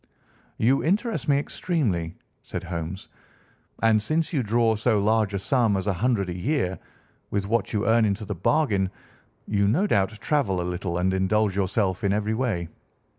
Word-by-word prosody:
"You 130 +5 +2
interest 205 +2 0
me 140 - +5
extremely," 110 - -1 0.3
said - - -6
Holmes. 85 +2 -5 0.8
"And 110 -1 +4
since 160 +8 -1
you 140 - +2
draw 115 0 +2
so 110 +1 +1
large 105 0 +2
a - - +1
sum 110 0 +1
as 95 - -3
a 100 - +1
hundred 110 0 0
a - - -5
year, 95 - -1 0.5
with 100 -1 -1
what 115 +2 0
you 105 -3 -1
earn 115 +1 +4
into 105 0 0
the 105 - -3
bargain, 100 - +1 0.6
you 100 -1 +2
no 150 - +2
doubt 100 - +2
travel 125 -12 0
a - - -1
little 90 0 -3
and 95 +1 +1
indulge 95 +2 +1
yourself 95 -1 0
in 100 -1 +2
every 105 +1 0
way. 110 -8 -1
105 Hz, 175 wpm, -25 LUFS, 95-120 Hz, 0.8 s, me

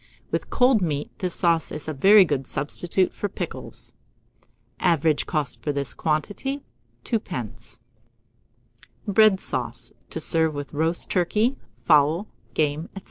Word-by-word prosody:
With - - -2
cold 250 -4 +4
meat, 150 -4 -2
this 180 -2 -2
sauce 170 -2 +1
is 150 0 -6
a 155 - -2
very 195 +7 +7
good 135 -5 -2
substitute 175 +6 0
for 205 - -3
pickles. - - -7 0.9
Average 160 -4 +2
cost 145 -6 -2
for 150 - -1
this 140 -2 -3
quantity, 205 - -2 0.4
2d. 125 - -4 1.3
BREAD 205 -1 +5
SAUCE - - -3 0.2
(to - - -4
serve 160 -2 +2
with 145 +1 -6
Roast 160 +3 0
Turkey, 210 +8 +2 0.3
Fowl, 155 +5 +4 0.3
Game, 155 +1 0
&c.). - - -5
160 Hz, 130 wpm, -24 LUFS, 145-195 Hz, 1.3 s, very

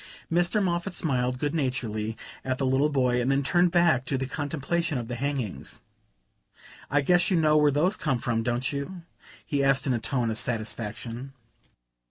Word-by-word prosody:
Mr. 175 +5 +2
Moffatt 175 +1 -1
smiled 125 -6 0
good 145 +3 -1
naturedly 115 -7 -2 0.3
at 130 -1 -1
the 135 - -1
little 135 +3 +3
boy 125 -4 +2
and 125 - 0
then 135 +1 +2
turned 175 +5 +3
back 170 -7 +3
to 135 - -1
the 130 - -2
contemplation 155 +3 -2
of 120 -2 -4
the 120 - -5
hangings. 130 -5 -4 1.1
"I 145 +1 +3
guess 175 +4 +3
you 185 - +3
know 155 -1 +4
where 150 -1 +5
those 165 +9 +2
come 135 -5 0
from, 115 -1 -1
don't 120 +3 -1
you?" 165 +6 -5 0.4
he 140 -3 0
asked 135 -1 +3
in 135 - +1
a 120 - 0
tone 120 -1 -1
of 110 - -3
satisfaction. 115 +3 -4
135 Hz, 180 wpm, -27 LUFS, 125-155 Hz, 1.1 s, where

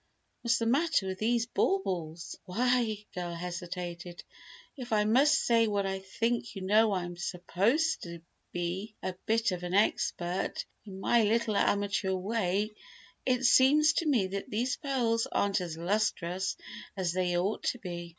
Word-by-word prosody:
What's 235 -1 +2
the 230 - -1
matter 285 - +2
with 190 0 -4
these 230 +1 +1
baubles?" 175 - -1
"Why," 245 +6 +2
the 210 -1 -5
girl 175 -1 -4
hesitated, 175 0 -6 0.5
"if 250 -4 -8
I 210 -1 +3
must 275 +7 +5
say 230 -3 +3
what 200 -2 0
I 190 0 -2
think 230 +5 -2
you 195 - -5
know 215 +3 +4
I 185 -2 0
am 175 0 -7
supposed 195 - 0
to 170 -1 -7 0.3
be 180 +5 -4
a 185 - -2
bit 225 -1 +2
of 180 -1 -3
an 180 +1 -3
expert, 180 -3 0 0.2
in 190 -2 -9
my 235 +4 +3
little 220 0 +1
amateur 200 -1 +1
way, 200 +1 -1 0.6
it 255 0 +2
seems 295 +6 +6
to 335 - 0
me 245 -10 +3
these 210 +6 -2
pearls 245 -6 0
aren't 200 -1 +1
as 170 -3 -5
lustrous 185 -1 -1 0.4
as 180 -3 0
they 180 -1 0
ought 195 +5 -1
to - - 0
be. 175 -5 -6
200 Hz, 160 wpm, -30 LUFS, 180-235 Hz, 0.6 s, seems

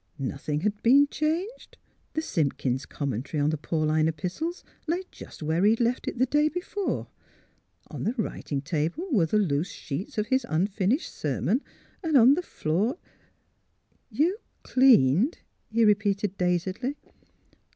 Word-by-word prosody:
Nothing 145 +2 -3
had 205 +2 -1
been 275 +5 +6
changed: 340 +12 -3 0.4
the 315 - -1
Simpkin's 135 - -1
Com 140 -2 -3
mentary 130 +7 -3
on 150 - +2
the - - 0
Pauline 155 0 +1
Epistles 180 - -3 0.2
lay 345 +4 0
just - - -11
where 160 +4 +1
he 205 - +6
had 225 - +2
left 240 +1 0
it - - -3
the 255 - +3
day 295 +4 +2
before; 365 +4 -3 0.8
on - - -7
the 225 - 0
writing 145 - -3
table 165 - -2
were 190 - +3
the 215 - +1
loose 170 -3 +1
sheets 150 +10 -6
of 210 - +1
his 260 +2 +1
unfinished 195 - 0
ser 145 -4 -2
mon; 235 - +1 0.4
and 320 -5 +3
on 250 +2 +7
the 340 - 0
floor 205 - -1 0.6
" - - -43
You 365 +7 +2
— - - -43
cleaned 245 - +4 0.2
" - - -46
he 230 +1 +3
repeated, 205 -2 +2
dazedly. 185 +9 -1
205 Hz, 160 wpm, -27 LUFS, -, 0.8 s, on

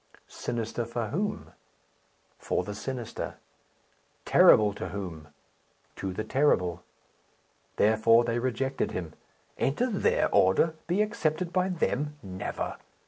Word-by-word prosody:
Sinister 115 0 -3
for 115 -1 -3
whom? 205 +6 -3 0.9
for - - -1
the 105 - -5
sinister. 120 +2 -5 0.9
Terrible 105 -1 +6
to - - -5
whom? 85 -7 -6 0.7
to 95 - -4
the 100 +4 -3
terrible. 90 - +1 0.9
Therefore 110 +2 +4
they 120 0 -1
rejected 130 +2 -1
him. 85 -4 -5 0.5
Enter 240 - +1
their 195 - +1
order? 95 - +4
be 185 +5 +2
accepted 180 -5 -2
by 185 0 +2
them? 150 -4 -1
Never. 95 -1 -4
120 Hz, 110 wpm, -28 LUFS, 100-155 Hz, 0.9 s, Terrible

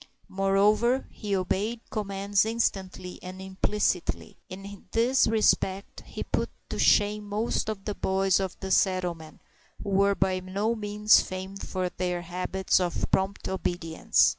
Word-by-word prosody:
Moreover, 205 +6 +2
he 205 -2 -3
obeyed 205 +5 -1
commands 200 -1 0
instantly 190 -5 -2
and 185 +1 -8
implicitly. 190 -1 -1
In 195 +1 -9
this 245 +3 +3
respect 210 -3 +1
he - - -5
put - - -1 0.2
to - - -4
shame 210 0 +3
most 215 +1 -1
of 195 -3 -5
the 210 - -2
boys 190 -1 +1
of 190 -2 -4
the 190 -1 -4
settlement, 180 -5 0 0.4
who - - -4
were 200 +1 +3
by 190 -1 +1
no 195 +5 -1
means 210 -1 +4
famed 190 +1 -6
for 185 -1 -2
their 180 -1 -3
habits 185 +2 0
of 180 -2 -1
prompt 190 +1 0
obedience. 175 -3 +1
195 Hz, 140 wpm, -27 LUFS, 185-210 Hz, 0.4 s, means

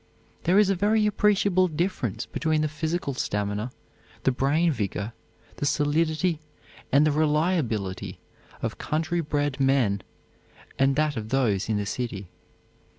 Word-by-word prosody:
There 180 +3 +4
is 205 -2 +5
a - - +2
very 210 +3 +2
appreciable 200 -3 +3
difference 160 - -2
between 155 +3 0
the 155 - +1
physical 155 0 -2
stamina, 105 -1 -2 0.5
the 130 - +3
brain 145 +6 +2
vigor, 105 -3 -3 0.4
the - - -2
solidity 155 +3 +1 0.5
and 140 +3 +5
the 155 - +3
reliability 150 - 0 0.5
of - - -3
country 165 +3 -1
bred 145 -2 -1
men 130 -7 +2 0.8
and 135 0 +4
that 150 -2 +1
of 110 -1 -4
those 110 -7 +1
in 110 - +1
the 100 - -2
city. 105 -4 -4
145 Hz, 135 wpm, -26 LUFS, 120-165 Hz, 0.8 s, is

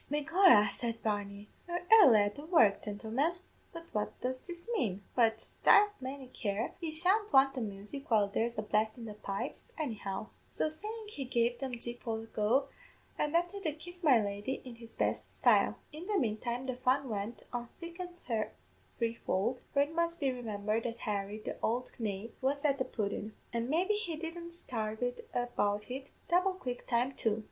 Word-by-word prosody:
"'Begorra,' 300 - +6
said 230 -1 -3
Barney, 205 -1 -2 0.2
'you're 350 0 -2
airly 280 - +9
at 205 0 +1
the 285 - -9
work, 230 - +5
gintlemen! 225 +10 -1 0.4
but 335 0 -8
what 210 -1 -2
does 255 +1 -1
this 345 +2 -8
mane? 200 - 0
But, 225 -2 +2
divle 415 0 +7
may 265 +1 -5
care, 205 +1 -2
yez 315 -2 0
shan't 415 +3 +3
want 270 0 +6
the 255 - -3
music 210 +6 -6
while 215 -3 +4
there's 230 +3 -1
a 215 - -1
blast 215 +2 +1
in 235 - -7
the 215 - -6
pipes, 205 +5 -5
anyhow!' 215 - -3 0.2
So - - 0
sayin' 425 +7 -6
he 300 -10 -5
gave 240 -1 +1
them 260 -3 -3
Jig 240 +1 -5
Polthogue, 225 +3 0 0.5
an' 300 +2 0
after 350 +4 +1
that 315 -5 -2
Kiss 350 +2 -10
my 270 -7 +7
Lady, 205 +5 -2
in 240 -2 -9
his 230 -1 -13
best - - -1
style. - - +4 0.2
"In 325 +4 -7
the 425 - -1
manetime 240 - -1
the 255 -1 -3
fun 260 +2 +2
went 215 +1 -4
on 240 -1 -3
thick 340 +1 -8
an' 355 -1 -5 0.8
threefold, 230 0 -1
for 280 - +4
it 295 +3 -6
must 335 0 0
be 275 -4 +2
remimbered 215 -3 -1
that 235 -1 -4
Harry, 205 0 -2
the - - -5
ould 245 +3 0
knave, 210 0 -3
was 280 +2 0
at 280 -1 +3
the 260 - +1
pudden; 210 0 -3 0.2
an' 235 +1 -1
maybe 360 +8 +2
he 415 -6 -1
didn't 335 +2 -6
sarve 225 -9 -3
it 245 0 -3
about 210 -3 0
in 265 +1 -4 0.2
double 365 +2 +3
quick 250 -9 -5
time 245 +2 +2
too. 225 -5 0
245 Hz, 185 wpm, -33 LUFS, 215-310 Hz, 0.8 s, airly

